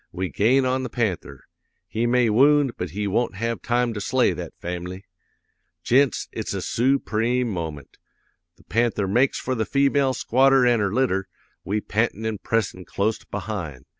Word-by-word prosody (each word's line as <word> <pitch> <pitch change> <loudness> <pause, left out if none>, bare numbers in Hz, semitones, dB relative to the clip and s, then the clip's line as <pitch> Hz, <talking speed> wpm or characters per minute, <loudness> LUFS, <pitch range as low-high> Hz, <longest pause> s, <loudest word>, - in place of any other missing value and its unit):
We 90 +1 -3
gain 120 - +3
on 130 +1 0
the 130 - -4
panther! 90 - -3 0.4
He 115 +2 -1
may 120 -2 +3
wound 140 +3 +4
but 90 - -4
he 105 +6 -3
won't 105 +2 0
have 115 +3 -3
time 120 0 0
to 105 - -5
slay - - +2
that - - -8
fam'ly. 90 +2 -6 0.8
"'Gents, 135 0 +2
it's - - -4
a - - -3
soopreme 125 -1 +1
moment! 80 -8 -6 0.6
The 100 - -23
panther 115 -4 0
makes 125 +7 +2
for 130 - -2
the 110 -3 0
female 140 +1 +2
squatter 135 +1 +4
an' 120 -2 +3
her 100 -2 0
litter, 95 -5 0 0.4
we 105 +2 -1
pantin' 110 +1 -1
an' 110 -2 -2
pressin' 110 -5 -1
clost 105 +2 -2
behind. 90 - -5
110 Hz, 165 wpm, -23 LUFS, 95-125 Hz, 0.8 s, wound